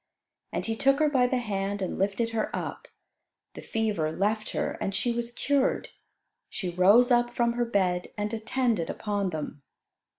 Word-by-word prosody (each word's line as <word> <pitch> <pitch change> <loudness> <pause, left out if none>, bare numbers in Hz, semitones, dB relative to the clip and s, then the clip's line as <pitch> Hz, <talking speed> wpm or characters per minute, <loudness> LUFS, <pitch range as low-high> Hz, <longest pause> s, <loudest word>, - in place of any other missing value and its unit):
And - - -2
He 225 - -1
took 275 +3 +3
her 305 0 +3
by 255 -3 +3
the 255 - 0
hand 200 -3 -2
and 190 - -3
lifted 200 +4 0
her 225 -1 -1
up. - - -5 0.7
The - - -8
fever 210 -9 -1
left 210 +5 -1
her - - -1
and 195 - -1
she 240 - +1
was 235 0 -3
cured. 275 +2 0 0.6
She 185 -4 -4
rose 205 +8 +5
up 240 0 +3
from 235 -1 +2
her 240 0 0
bed 185 -5 0
and 210 +1 -2
attended 225 -4 0
upon 205 -2 -2
them. 155 -3 -5
220 Hz, 170 wpm, -27 LUFS, 195-240 Hz, 0.7 s, rose